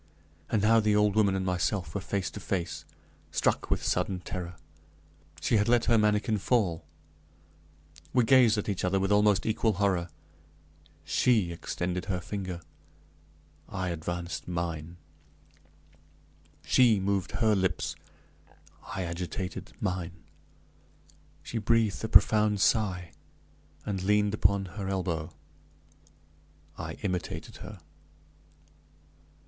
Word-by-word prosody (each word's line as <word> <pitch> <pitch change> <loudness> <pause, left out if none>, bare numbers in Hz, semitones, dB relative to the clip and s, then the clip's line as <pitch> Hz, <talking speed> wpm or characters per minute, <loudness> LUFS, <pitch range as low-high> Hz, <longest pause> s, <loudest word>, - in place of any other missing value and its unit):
And 110 -3 +1
now 115 +1 +5
the 105 -1 +2
old 105 -1 +3
woman 100 -3 +3
and 95 -1 -1
myself 90 -2 -1
were 100 - -2
face 100 0 -2
to - - -7
face. 95 -3 -3 0.4
Struck - - 0
with - - 0
sudden 90 +1 0
terror, 90 -1 -6 0.8
she 110 +9 +2
had 105 +2 +2
let 120 -1 +4
her 115 - +4
manikin 105 0 +2
fall! 95 -7 +1 1.3
We 125 -2 +3
gazed 120 -2 +5
at 105 - -2
each 100 -3 -2
other 95 +1 +2
with 95 +1 0
almost 105 -2 +4
equal 110 0 +1
horror. 95 -3 0 0.9
She 110 -2 +2
extended 90 +1 -3
her 95 -2 -1
finger 95 -1 -5 1.1
I 95 -3 -3
advanced 85 +1 -4
mine. 85 -1 -4 1.7
She 120 -5 +5
moved 95 -1 -1
her 110 +1 +2
lips 95 -2 0 0.9
I 95 - -3
agitated 90 +2 -5
mine. 90 -2 -2 1.3
She 115 - -3
breathed 110 -1 +1
a - - 0
profound 105 -1 +5
sigh, 95 -5 +1 0.7
and 100 -3 -2
leaned 105 +1 +2
upon 100 -1 +2
her 95 +2 -6
elbow. 90 -4 -2 1.5
I - - -5
imitated 90 -3 -4
her. 105 -4 -10
95 Hz, 115 wpm, -29 LUFS, 90-105 Hz, 1.7 s, now